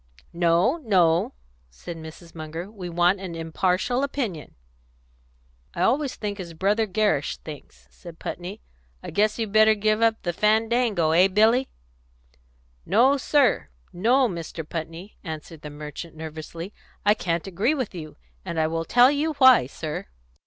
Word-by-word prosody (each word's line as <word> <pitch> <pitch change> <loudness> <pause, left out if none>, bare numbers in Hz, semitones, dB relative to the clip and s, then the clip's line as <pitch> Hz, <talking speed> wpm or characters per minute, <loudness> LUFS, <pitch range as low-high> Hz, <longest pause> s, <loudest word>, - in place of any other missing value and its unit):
"No, 175 - +2
no," 180 - +2 0.4
said 65 - -9
Mrs. 160 +1 -11
Munger. 165 +4 -7
"We 190 -5 -7
want 175 +3 +2
an 185 -3 -6
impartial 180 +9 0
opinion." 245 - -4 1.2
"I 175 - 0
always 270 +6 +1
think 205 -1 -5
as 170 -3 -7
Brother 205 +6 +1
Gerrish 200 -7 0
thinks," 150 -2 -12
said 170 -2 -12
Putney. 180 +6 -6 0.4
"I - - -7
guess 210 +1 +1
you 225 - -1
better 215 +1 +4
give 215 +1 +1
up 225 -1 +2
the 175 - -1
fandango; 220 -3 +2
hey, 180 +4 +5
Billy?" 220 +7 +3 1.1
"No, 245 +9 +4
sir; 275 -3 +2 0.2
no, 245 +8 +3
Mr. 170 -4 -6
Putney," 165 +5 -7
answered 160 -2 -8
the 150 - -7
merchant 150 +2 -8
nervously. 160 +4 -8 0.3
"I 205 - +6
can't 170 -5 -2
agree 200 - 0
with 255 -8 -3
you. 155 -4 -9 0.3
And 165 - -4
I 160 - +3
will 165 +1 -2
tell 245 +7 +5
you 300 +2 0
why, 260 - +6
sir." 150 +2 -6
185 Hz, 145 wpm, -24 LUFS, 165-225 Hz, 1.2 s, I